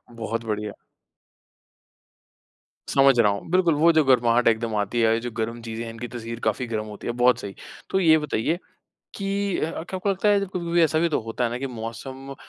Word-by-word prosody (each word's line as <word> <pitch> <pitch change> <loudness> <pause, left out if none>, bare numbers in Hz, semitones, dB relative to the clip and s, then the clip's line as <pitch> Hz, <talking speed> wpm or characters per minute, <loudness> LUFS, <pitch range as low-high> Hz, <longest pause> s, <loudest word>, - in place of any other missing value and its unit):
बहुत 115 0 -3
बढ़िया। 105 -1 -3 2.2
समझ 135 -3 +5
रहा 105 -3 +5
हूँ। 100 +9 -6
बिल्कुल, 180 -2 +4
वो 165 +3 +5
जो 155 -1 +4
गर्माहट 120 -2 +4
एकदम 115 -1 +1
आती 105 +3 0
है 115 - +4
और 110 - +4
ये 115 - +1
जो 120 +1 -5
गर्म 115 +1 -3
चीज़ें 115 0 -5
हैं 115 - -6
इनकी 120 +2 -6
तासीर 115 -1 -7
काफ़ी 110 +3 0
गरम 110 -2 -3
होती 105 -1 -8
है, 120 - -1
बहुत 125 +1 +3
सही। 100 -1 -7 0.3
तो 190 - +1
ये 160 -3 +6
बताइए 150 +2 -1 0.6
कि 200 -1 -1
अ, - - 0
क्या 175 +3 -6
आपको 195 +2 -1
लगता 195 +2 +1
है 205 -1 +4
कभी-कभी 175 -3 -1
ऐसा 155 -1 +3
भी 170 +1 +2
तो 155 - 0
होता 115 +2 -3
है 115 - 0
ना 120 - -3
कि 135 - -3
मौसम 130 +3 -7
120 Hz, 210 wpm, -24 LUFS, 115-160 Hz, 2.2 s, ये